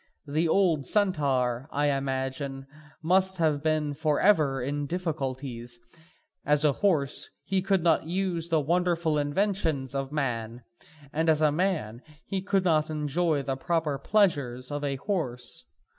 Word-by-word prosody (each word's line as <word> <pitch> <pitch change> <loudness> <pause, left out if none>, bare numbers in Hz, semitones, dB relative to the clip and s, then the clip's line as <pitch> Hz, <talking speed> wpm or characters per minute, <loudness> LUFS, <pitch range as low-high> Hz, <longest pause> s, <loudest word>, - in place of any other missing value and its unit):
The 155 +3 0
old 160 -6 +2
centaur, 140 - +1
I 145 0 +1
imagine, 135 0 -3 0.4
must 190 +3 +3
have 155 -4 +1
been 155 -1 0
for 155 0 0
ever 155 -10 +3
in 145 +3 -3
difficulties; 135 -8 -4 0.6
as 150 +1 +4
a 150 - +5
horse, 150 -5 +1
he 190 +1 0
could 195 -2 +1
not 160 -2 +2
use 175 -2 -2
the 160 -1 +3
wonderful 170 0 +1
inventions 145 -4 0
of 135 0 -3
man, 120 -5 -3 0.5
and 160 +2 +1
as 155 -1 +3
a 150 - +4
man, 150 - -1 0.2
he 195 -1 -3
could 195 0 +1
not 155 -3 +2
enjoy 155 0 0
the 135 0 -2
proper 150 0 -1
pleasures 140 - +1
of 145 0 -3
a 140 -1 -1
horse. 135 - -3
150 Hz, 145 wpm, -27 LUFS, 135-175 Hz, 0.6 s, a